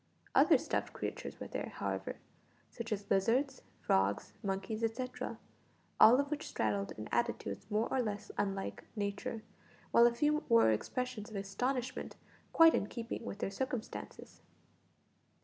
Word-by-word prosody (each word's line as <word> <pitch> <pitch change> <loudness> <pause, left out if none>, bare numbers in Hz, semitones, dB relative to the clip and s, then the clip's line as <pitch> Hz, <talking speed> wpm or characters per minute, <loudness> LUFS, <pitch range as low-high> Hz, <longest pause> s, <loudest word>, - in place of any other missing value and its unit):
Other - - +7
stuffed - - -2
creatures - - -5
were - - -5
there, - - -5
however, - - -3 0.6
such 235 -1 -6
as 205 -1 -3
lizards, 235 +8 +2 0.2
frogs, 95 +1 +1
monkeys, 195 +2 -2
etcetera, 250 +3 -3 0.6
all 245 +4 +9
of 285 +1 -1
which 300 - -3
straddled 100 -2 -1
in 110 - -6
attitudes 120 - -1
more 215 +1 +1
or 265 - +3
less 210 -2 -4
unlike 195 -1 -2
nature, 205 +1 -3 0.5
while 235 0 +7
a - - +3
few 300 +3 +2
wore 115 -1 +6
expressions 230 - -2
of 220 - -9
astonishment 245 +6 -2 0.4
quite 330 0 +7
in 205 - +1
keeping 230 0 -5
with 200 - -5
their 195 - -2
circumstances. 250 +1 -5
215 Hz, 140 wpm, -34 LUFS, 195-250 Hz, 0.6 s, all